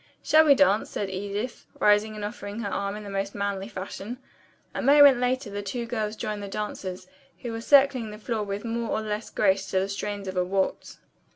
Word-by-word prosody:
"Shall 315 Hz, +1 st, +6 dB
we 285 Hz, -2 st, +7 dB
dance?" 195 Hz, -1 st, +3 dB
said 195 Hz, -2 st, -3 dB
Edith, 205 Hz, +5 st, -4 dB
rising 210 Hz, +1 st, +3 dB
and 210 Hz, -1 st, -4 dB
offering 210 Hz, 0 st, -6 dB
her 205 Hz, -, -2 dB
arm 200 Hz, 0 st, -2 dB
in 210 Hz, -, -7 dB
her 205 Hz, -, -8 dB
most 195 Hz, 0 st, -3 dB
manly 200 Hz, -1 st, -2 dB
fashion. 200 Hz, +3 st, -6 dB, 0.6 s
A -, -, -3 dB
moment 280 Hz, -2 st, +7 dB
later 250 Hz, -2 st, -1 dB
the 205 Hz, 0 st, -4 dB
two 235 Hz, +4 st, -4 dB
girls 220 Hz, -2 st, -2 dB
joined 215 Hz, -2 st, -4 dB
the 200 Hz, -, -5 dB
dancers, 195 Hz, -3 st, -5 dB, 0.4 s
who 240 Hz, -, -3 dB
were 225 Hz, 0 st, -4 dB
circling 270 Hz, -3 st, +4 dB
the 210 Hz, -, -8 dB
floor 220 Hz, 0 st, -3 dB
with 200 Hz, +1 st, -4 dB
more 230 Hz, 0 st, -2 dB
or 220 Hz, -, 0 dB
less 215 Hz, 0 st, -4 dB
grace 195 Hz, -1 st, +1 dB
to 190 Hz, -, +1 dB
the 190 Hz, -, 0 dB
strains 200 Hz, 0 st, -4 dB
of 190 Hz, -, -4 dB
a 180 Hz, -, +2 dB
waltz. 190 Hz, +1 st, -2 dB
210 Hz, 210 wpm, -26 LUFS, 200-230 Hz, 0.6 s, we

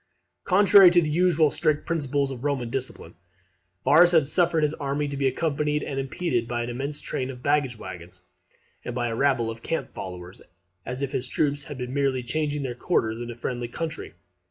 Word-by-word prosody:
] -, -, -53 dB
Contrary 195 Hz, 0 st, +7 dB
to 175 Hz, 0 st, +4 dB
the 155 Hz, -3 st, 0 dB
usual 165 Hz, -2 st, +3 dB
strict 150 Hz, -1 st, +1 dB
principles 145 Hz, -4 st, -1 dB
of 125 Hz, -1 st, -7 dB
Roman 135 Hz, -5 st, -1 dB
discipline, 130 Hz, -10 st, -5 dB, 0.7 s
Varus 175 Hz, +3 st, +6 dB
had 160 Hz, -5 st, +4 dB
suffered 165 Hz, 0 st, +2 dB
his 150 Hz, 0 st, +1 dB
army 145 Hz, 0 st, -2 dB
to 140 Hz, -, -5 dB
be 135 Hz, -1 st, +1 dB
accompanied 150 Hz, +1 st, -1 dB
and 135 Hz, -1 st, -3 dB
impeded 135 Hz, -3 st, -2 dB
by 120 Hz, 0 st, -2 dB
an 120 Hz, -, -4 dB
immense 140 Hz, +4 st, -3 dB
train 130 Hz, 0 st, -3 dB
of 125 Hz, -1 st, -9 dB
baggage 145 Hz, -4 st, +1 dB
waggons, 90 Hz, -2 st, -10 dB, 0.6 s
and 120 Hz, -, -5 dB
by 120 Hz, -1 st, -1 dB
a 115 Hz, -, -3 dB
rabble 120 Hz, -3 st, +1 dB
of 115 Hz, 0 st, -10 dB
camp 165 Hz, -, -3 dB
followers; 90 Hz, 0 st, -8 dB, 0.5 s
as 125 Hz, +3 st, -3 dB
if 135 Hz, -, -2 dB
his 130 Hz, -3 st, -2 dB
troops 145 Hz, +2 st, -1 dB
had 145 Hz, -, -8 dB
been 125 Hz, 0 st, -5 dB
merely 135 Hz, -3 st, 0 dB
changing 150 Hz, +3 st, -2 dB
their 130 Hz, -2 st, -3 dB
quarters 115 Hz, -4 st, -1 dB
in 120 Hz, 0 st, -6 dB
a 120 Hz, -, -6 dB
friendly 120 Hz, 0 st, -4 dB
country. 155 Hz, -, -6 dB
140 Hz, 200 wpm, -25 LUFS, 120-150 Hz, 0.7 s, Contrary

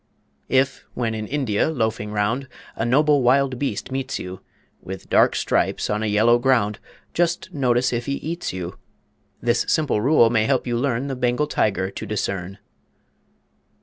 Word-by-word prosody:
If, 135 Hz, +1 st, +1 dB
when 115 Hz, -2 st, -1 dB
in 110 Hz, -1 st, -4 dB
India 130 Hz, -4 st, 0 dB
loafing 110 Hz, -7 st, -2 dB
round, 105 Hz, +6 st, -1 dB, 0.3 s
A -, -, -2 dB
noble 145 Hz, +3 st, +4 dB
wild 130 Hz, 0 st, +2 dB
beast 140 Hz, -1 st, -3 dB
meets 130 Hz, 0 st, -2 dB
you, 90 Hz, 0 st, -7 dB, 0.4 s
With 95 Hz, 0 st, -9 dB
dark -, -, +4 dB
stripes -, -, 0 dB
on 105 Hz, +1 st, 0 dB
a 110 Hz, -, 0 dB
yellow 110 Hz, +3 st, +4 dB
ground, 120 Hz, -5 st, +2 dB, 0.3 s
Just 170 Hz, 0 st, 0 dB
notice 125 Hz, -3 st, +1 dB
if 120 Hz, 0 st, -2 dB
he 140 Hz, -, 0 dB
eats 165 Hz, +5 st, -4 dB
you. 90 Hz, -1 st, -6 dB, 0.6 s
This -, -, +2 dB
simple 145 Hz, -9 st, +1 dB
rule 120 Hz, -3 st, +5 dB
may 110 Hz, -2 st, +2 dB
help 130 Hz, +1 st, +1 dB
you 120 Hz, -1 st, -1 dB
learn 125 Hz, +1 st, 0 dB
The 135 Hz, -1 st, -3 dB
Bengal 125 Hz, +3 st, +1 dB
Tiger 95 Hz, -9 st, 0 dB
to 110 Hz, -, -6 dB
discern. 95 Hz, -2 st, -3 dB
120 Hz, 160 wpm, -22 LUFS, 105-135 Hz, 0.6 s, rule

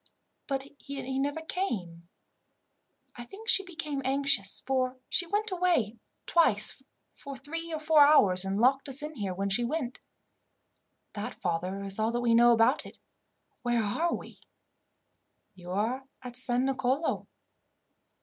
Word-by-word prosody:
But 270 Hz, -1 st, -2 dB
he 270 Hz, -1 st, -5 dB
never 285 Hz, +3 st, -2 dB
came. 180 Hz, -, -4 dB, 1.1 s
I 240 Hz, -, -7 dB
think 400 Hz, -, -12 dB
she 395 Hz, -, +5 dB
became 315 Hz, -6 st, -5 dB
anxious, 270 Hz, -6 st, +2 dB
for 255 Hz, -1 st, 0 dB
she 355 Hz, -, +2 dB
went 415 Hz, +3 st, +1 dB
away 340 Hz, -, +1 dB, 0.3 s
twice 220 Hz, -10 st, +3 dB, 0.3 s
for 280 Hz, -1 st, -9 dB
three 330 Hz, +5 st, -6 dB
or 315 Hz, -, -3 dB
four 310 Hz, -1 st, +4 dB
hours, 200 Hz, -11 st, +5 dB
and 195 Hz, +1 st, -2 dB
locked 270 Hz, +4 st, +2 dB
us 270 Hz, +2 st, +2 dB
in 305 Hz, +1 st, -5 dB
here 200 Hz, -8 st, -4 dB
when 195 Hz, +1 st, -2 dB
she 240 Hz, +5 st, +2 dB
went. 255 Hz, -1 st, -3 dB, 1.1 s
"That, 205 Hz, 0 st, -5 dB
father, 180 Hz, +1 st, -3 dB
is 195 Hz, +1 st, -2 dB
all 230 Hz, +2 st, 0 dB
we 240 Hz, -1 st, +2 dB
know 240 Hz, +1 st, +6 dB
about 225 Hz, -1 st, +3 dB
it. -, -, -12 dB, 0.6 s
Where 240 Hz, -2 st, +1 dB
are 320 Hz, +12 st, 0 dB
we?" -, -, -11 dB, 1.1 s
"You 180 Hz, -1 st, -12 dB
are 230 Hz, +8 st, -2 dB, 0.2 s
at 245 Hz, -1 st, -8 dB
San 255 Hz, 0 st, +4 dB
Nicolo." 270 Hz, +3 st, -1 dB
255 Hz, 140 wpm, -29 LUFS, 215-300 Hz, 1.1 s, know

